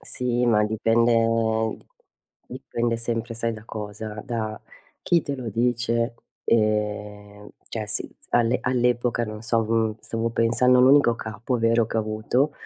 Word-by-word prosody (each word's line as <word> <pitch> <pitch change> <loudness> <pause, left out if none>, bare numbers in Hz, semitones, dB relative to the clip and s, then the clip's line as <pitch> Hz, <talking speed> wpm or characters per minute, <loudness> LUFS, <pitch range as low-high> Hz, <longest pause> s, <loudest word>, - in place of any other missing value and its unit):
Sì, 125 -1 -1
ma 105 -2 +4
dipende 115 0 +2 0.7
dipende 115 0 -3
sempre 115 0 -3
sai 115 0 -1
da 110 0 -10
cosa? 105 0 -6
Da 110 -4 -4 0.4
chi 170 -2 +2
te 140 - -3
lo 125 -3 -5
dice 120 +1 0 0.3
e 105 -1 -1 0.2
cioè 110 -2 -4
sì, - - -2 0.2
all'e 120 +1 +2
all'epoca, 120 -1 +1
non 105 -1 -7
so, 115 -1 +1
stavo 115 0 -2
pensando 115 +2 +3
a - - +6
un 130 - +6
unico 140 -4 +5
capo 110 +3 -4
vero 115 0 +2
che 115 - -4
ho - - +3
avuto, 110 +7 0
115 Hz, 140 wpm, -24 LUFS, 110-120 Hz, 0.7 s, a